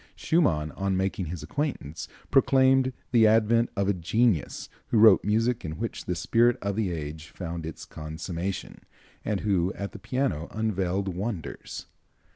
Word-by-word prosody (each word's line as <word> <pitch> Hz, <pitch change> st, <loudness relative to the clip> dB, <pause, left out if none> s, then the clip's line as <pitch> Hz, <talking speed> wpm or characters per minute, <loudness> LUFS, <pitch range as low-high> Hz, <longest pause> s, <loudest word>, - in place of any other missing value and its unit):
Schumann, 80 Hz, -, +1 dB
on 95 Hz, +1 st, -1 dB
making 95 Hz, -1 st, -1 dB
his 80 Hz, -2 st, -6 dB
acquaintance, 85 Hz, -, -3 dB, 0.2 s
proclaimed 130 Hz, -1 st, +4 dB, 0.2 s
the 115 Hz, -3 st, +6 dB
advent 115 Hz, +2 st, +3 dB
of 100 Hz, 0 st, 0 dB
a 100 Hz, -, +3 dB
genius 100 Hz, +1 st, 0 dB, 0.2 s
who -, -, +1 dB
wrote 110 Hz, +1 st, +7 dB
music 115 Hz, +3 st, +1 dB
in 80 Hz, -2 st, -5 dB
which 115 Hz, +2 st, -4 dB
the 90 Hz, -, -1 dB
spirit 120 Hz, +7 st, +3 dB
of 100 Hz, -1 st, -2 dB
the 105 Hz, -4 st, 0 dB
age 80 Hz, 0 st, -5 dB
found 85 Hz, -3 st, -5 dB
its 80 Hz, -, -8 dB
consummation, 85 Hz, +4 st, -5 dB, 0.4 s
and 105 Hz, -3 st, -1 dB
who, 95 Hz, -3 st, +1 dB
at 100 Hz, 0 st, -5 dB
the -, -, -10 dB
piano, 125 Hz, -, -1 dB
unveiled 100 Hz, -3 st, -1 dB
wonders. 95 Hz, -3 st, -5 dB
100 Hz, 150 wpm, -27 LUFS, 85-115 Hz, 0.4 s, wrote